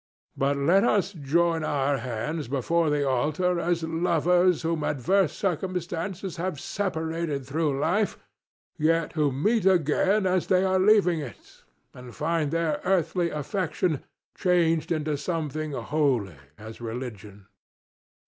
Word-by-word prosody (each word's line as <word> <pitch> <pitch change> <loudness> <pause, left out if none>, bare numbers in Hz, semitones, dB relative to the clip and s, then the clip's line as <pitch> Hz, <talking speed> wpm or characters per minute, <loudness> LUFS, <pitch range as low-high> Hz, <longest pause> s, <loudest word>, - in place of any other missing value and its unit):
But 140 +1 +1
let 170 +8 +3
us 205 -3 +1
join 165 +2 +1
our 140 -2 0
hands 130 +6 -4
before 155 +5 +1
the 145 -1 +1
altar 155 +7 +1
as 170 0 0
lovers 170 +1 +2
whom 165 -1 -1
adverse 155 +6 +1
circumstances 180 0 -3
have 170 -3 -3
separated 160 -7 -3
through 145 0 -1
life, 200 +8 0 0.6
yet 165 +1 +1
who 150 -3 +1
meet 195 - +1
again 190 +4 +3
as 185 -1 +1
they 185 0 +3
are 190 0 +2
leaving 190 -4 +4
it 130 -8 -10 0.3
and 125 -1 -11
find 160 -1 0
their 165 -1 -1
earthly 180 -2 +1
affection 160 0 -2 0.3
changed 170 -3 +1
into 155 -2 -1
something 155 -1 -3
holy 130 - 0 0.2
as 110 +2 -10
religion. 110 -4 -7
160 Hz, 125 wpm, -26 LUFS, 145-180 Hz, 0.6 s, leaving